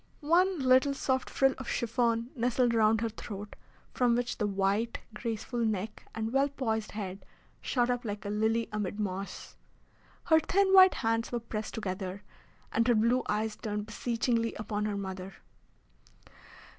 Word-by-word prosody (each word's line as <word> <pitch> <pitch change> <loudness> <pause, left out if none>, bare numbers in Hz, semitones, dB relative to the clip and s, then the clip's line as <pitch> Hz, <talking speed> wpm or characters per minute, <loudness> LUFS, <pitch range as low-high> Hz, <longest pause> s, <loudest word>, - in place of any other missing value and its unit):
One 360 +4 +4
little 260 +1 +4
soft 260 -1 -1
frill 270 -1 +3
of 260 - -6
chiffon 235 0 0
nestled 245 0 +2
round 220 -1 +3
her 230 - 0
throat, 205 -1 -8 0.4
from 245 -2 +3
which 245 0 -2
the 210 - +1
white, 200 +4 0 0.2
graceful 230 +2 -4
neck 215 -2 -2
and 225 +1 -3
well 275 +1 +3
poised 225 -6 -2
head 195 -2 -5 0.4
shot 245 -1 +1
up 245 0 -2
like 205 -3 -5
a 200 - -2
lily 220 +2 +1
amid 210 -1 -3
moss. 195 -1 -5 0.7
Her 320 -1 +5
thin 385 +4 +2
white 375 -1 +8
hands 225 -1 0
were 240 - -1
pressed 220 -2 -5
together, 190 -2 -4 0.5
and 230 +1 +2
her 240 - +5
blue 235 +4 +3
eyes 215 +1 0
turned 210 -2 -4
beseechingly 230 0 -1
upon 210 0 -3
her 210 -1 -2
mother. 190 -1 -6
225 Hz, 155 wpm, -30 LUFS, 210-245 Hz, 0.7 s, white